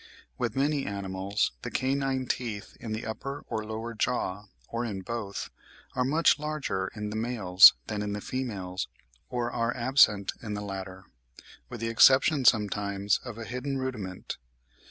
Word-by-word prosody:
With - - -2
many 140 +1 +1
animals 100 0 -1
the - - -4
canine 135 0 0
teeth 115 -5 -4
in 115 - -6
the 110 +1 -3
upper 135 +6 -5
or 110 - -1
lower 110 +2 -5
jaw, 105 -3 -1 0.2
or 115 +1 -3
in 100 -5 -4
both, 105 -1 -5 0.4
are 125 - +1
much 150 +4 +3
larger 150 -11 -2
in 105 -1 -4
the - - -5
males 110 -6 +7
than 105 -1 -3
in 105 0 -2
the 105 - -3
females, 100 -7 -4 0.4
or 120 -1 -2
are 115 +1 -1
absent 120 -6 +4
in 105 -3 -4
the 105 - -4
latter, 95 -2 -6 0.6
with 120 -2 -7
the 115 - -1
exception 135 +4 +5
sometimes 100 -2 +2
of 120 -3 -7
a 115 - -6
hidden 125 +3 -3
rudiment. 110 -9 -5
110 Hz, 155 wpm, -28 LUFS, 100-130 Hz, 0.6 s, males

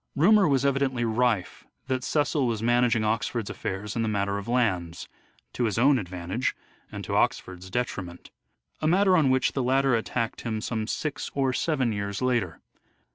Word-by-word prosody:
Rumour 200 +6 +5
was 140 -2 +2
evidently 135 -3 +1
rife 115 -4 0 0.2
that 130 -1 -2
Cecil 145 -1 +1
was 115 -2 -2
managing 120 -1 +3
Oxford's 110 0 -1
affairs 100 +2 -5
in 115 - 0
the 115 - 0
matter 100 -1 -1
of 100 - -9
lands, 95 -9 -1 0.5
to 120 - 0
his 105 -3 -1
own 135 +2 +4
advantage 90 +5 -3 0.4
and - - -6
to - - -3
Oxford's 95 0 -1
detriment: 95 -6 -4 0.5
a 155 - +1
matter 190 +3 +4
on 155 -6 +4
which 130 0 +2
the 135 - -1
latter 135 +1 +2
attacked 115 0 -2
him 110 -2 -3
some 110 0 -3
six 150 +4 -3
or 135 -2 +1
seven 135 -5 0
years 100 -1 -3
later. 120 -9 -1
120 Hz, 170 wpm, -26 LUFS, 105-135 Hz, 0.5 s, Rumour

